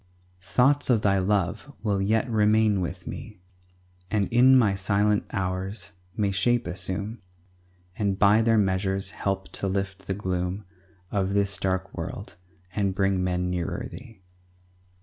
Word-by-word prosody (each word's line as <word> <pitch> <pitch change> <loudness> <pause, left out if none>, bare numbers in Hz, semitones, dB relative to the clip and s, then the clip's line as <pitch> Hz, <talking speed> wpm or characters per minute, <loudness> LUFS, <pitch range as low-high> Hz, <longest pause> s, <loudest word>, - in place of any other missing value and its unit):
Thoughts 130 +11 +2
of 115 -4 +3
Thy 100 -1 +3
love 95 +7 0
will 100 -3 +1
yet 110 +4 +1
remain 105 -2 +3
with 90 +1 -5
me, 110 -5 -8 0.7
And 105 -2 +1
in 130 +2 +7
my 110 -6 +4
silent 100 +2 +1
hours 95 +1 -3 0.3
may 100 -2 +1
shape 120 +5 +1
assume, 95 +5 -4 0.7
And 100 -2 0
by 105 +2 +5
their 115 0 +3
measures 95 -1 0
help 95 -1 -3
to 100 - -2
lift 95 0 -3
the 95 - -1
gloom 95 0 -3 0.5
Of 100 -1 0
this 100 -1 +2
dark 95 0 -2
world, - - -6 0.4
and 100 -2 0
bring 95 -1 +1
men 90 0 -1
nearer 90 -2 -3
Thee. 115 -7 -12
100 Hz, 140 wpm, -26 LUFS, 95-105 Hz, 0.7 s, in